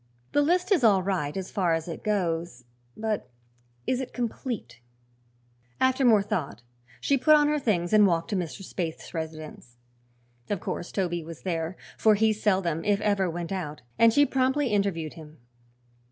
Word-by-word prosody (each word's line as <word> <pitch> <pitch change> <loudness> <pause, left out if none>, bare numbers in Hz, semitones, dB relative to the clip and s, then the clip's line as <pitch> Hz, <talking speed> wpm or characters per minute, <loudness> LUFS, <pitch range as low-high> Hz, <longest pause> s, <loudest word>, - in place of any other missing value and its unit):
"The 290 - +3
list 355 +6 +1
is 350 -10 +4
all 200 -5 +5
right, 180 -5 -1
as 190 -1 -5
far 180 -5 +1
as 165 0 -4
it 165 - -6
goes; 170 - -1 0.3
but 220 -1 -2 0.6
is 255 0 0
it 255 - -7
complete?" 230 - -4 1.0
After 260 +1 +2
more 220 -5 +5
thought 140 - -3 0.4
she 280 -1 +1
put 310 +4 +6
on 295 -1 +4
her 300 0 +1
things 180 -9 0
and 210 -1 +7
walked 170 -2 0
to - - 0
Mr. 180 +1 -4
Spaythe's 170 -3 -5
residence. 155 -7 -7 0.7
Of 205 - -1
course 175 - -5
Toby 175 -3 -1
was 165 0 -10
there, 170 -1 -2 0.2
for 215 -1 +5
he 220 +1 +3
seldom 190 -6 0
if 205 -1 +2
ever 200 -3 +1
went 170 +1 -5
out, 155 -7 -4 0.2
and 230 0 +7
she 285 +5 +5
promptly 265 +1 +1
interviewed 195 -7 0
him. 155 -1 -12
195 Hz, 170 wpm, -27 LUFS, 165-225 Hz, 1.0 s, and